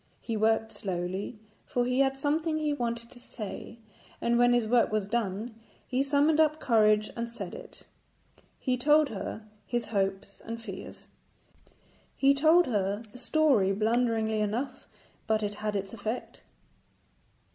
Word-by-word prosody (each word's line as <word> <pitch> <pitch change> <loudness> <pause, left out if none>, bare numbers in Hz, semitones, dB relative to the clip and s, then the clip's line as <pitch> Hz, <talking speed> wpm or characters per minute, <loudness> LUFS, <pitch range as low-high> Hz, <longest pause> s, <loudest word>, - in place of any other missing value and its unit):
He 230 - -4
worked 220 +1 +2
slowly, 185 +3 -4 0.3
for 245 -4 -1
he 250 +1 0
had 270 0 +3
something 310 +3 0
he 305 -1 0
wanted 235 -3 -3
to 245 - -13
say, 225 -1 -8 0.4
and 235 0 +1
when 245 0 +5
his 240 -2 +3
work 235 0 +3
was 215 -2 0
done 220 +1 -2 0.3
he 260 +1 0
summoned 290 +3 +3
up 310 0 +3
courage 215 -4 +3
and 235 0 -3
said 235 - -7
it. - - -10 0.7
He 255 -1 0
told 295 +3 +4
her 215 +1 -6 0.2
his 240 -1 -1
hopes 195 0 -1
and 230 0 -5
fears. 200 -5 -9 1.1
He 275 0 +4
told 320 +5 +5
her 205 -2 -1
the 250 - -12
story 260 -8 +3
blunderingly 220 0 +1
enough, 250 +6 -3 0.4
but 220 -1 +1
it 205 0 -1
had 210 -1 -1
its 195 +1 -3
effect. 220 +2 -5
235 Hz, 145 wpm, -29 LUFS, 215-270 Hz, 1.1 s, when